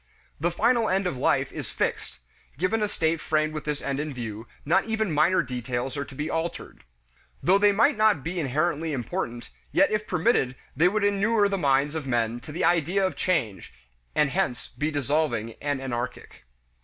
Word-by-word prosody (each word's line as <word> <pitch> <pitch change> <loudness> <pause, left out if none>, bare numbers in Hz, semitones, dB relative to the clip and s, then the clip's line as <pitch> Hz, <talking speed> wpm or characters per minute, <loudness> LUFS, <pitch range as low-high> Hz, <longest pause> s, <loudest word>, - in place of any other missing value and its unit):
The 170 +4 +1
final 230 +6 +2
end 190 +1 +1
of 180 - -1
life 125 - +1
is - - -6
fixed; - - -2 0.4
given 185 +7 0
a 210 - +2
state 165 -4 0
framed 155 0 0
with 155 - -5
this 150 -1 -3
end 140 0 -2
in 150 -2 -4
view, 115 -2 -6 0.2
not 180 +6 +3
even 220 -4 -1
minor 155 +4 +3
details 125 0 -3
are 140 -1 -3
to 135 - -12
be 150 +3 -3
altered. 165 +1 -4 0.6
Though 190 +3 +5
they 205 0 +5
might 255 +8 +3
not 215 -10 +3
be 175 +2 -3
inherently 155 +2 0
important, 120 -2 -4 0.2
yet 295 - +4
if 215 0 -1
permitted 165 - +1 0.2
they 160 +6 +4
would 210 +3 0
inure 205 +1 +3
the 200 -1 -1
minds 140 -1 +2
of 155 -4 -4
men 120 -1 0
to 140 - -10
the 160 - -1
idea 175 +3 +2
of 185 - -2
change, 135 - -1 0.4
and 150 -2 +3
hence 180 -9 -1
be 150 +1 -2
dissolving 140 -6 0
and 145 -2 -1
anarchic. 125 - -5
155 Hz, 185 wpm, -26 LUFS, 135-190 Hz, 0.6 s, Though